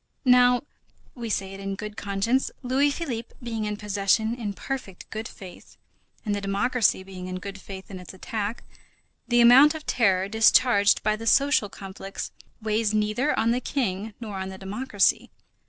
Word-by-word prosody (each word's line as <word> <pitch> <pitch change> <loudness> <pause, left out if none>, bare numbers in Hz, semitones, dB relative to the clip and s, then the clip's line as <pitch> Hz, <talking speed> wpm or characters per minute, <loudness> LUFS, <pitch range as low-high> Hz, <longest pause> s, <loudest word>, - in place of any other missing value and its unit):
Now, 250 0 +5 0.5
we 235 -3 -6
say 195 -2 -2
it 195 - -9
in 195 0 -4
good 210 +1 -7
conscience, 205 +7 0
Louis 265 +3 +2
Philippe 260 -7 -4
being 225 -2 -3
in 210 0 -3
possession 210 +2 +1
in 225 -4 -4
perfect 230 -5 -6
good 220 +1 -4
faith, 185 -2 -13 0.5
and 210 - 0
the 205 - -2
democracy 200 +1 +1
being 185 -1 -8
in 185 - -5
good 200 +1 -8
faith 190 0 -9
in 190 - -7
its 180 - -10
attack, 210 +4 -4 0.6
the 240 0 +4
amount 265 +6 +8
of 310 - -8
terror 195 -5 +2
discharged 220 -1 +4
by 215 0 +2
the 225 +1 -7
social 275 -4 +3
conflicts 195 0 -7 0.3
weighs 215 0 0
neither 215 +7 +1
on 225 +1 +2
the 245 +2 0
King 215 -6 -2
nor 215 -4 -6
on 190 0 -4
the 190 - -8
democracy. 205 +3 0
215 Hz, 170 wpm, -25 LUFS, 195-245 Hz, 0.6 s, amount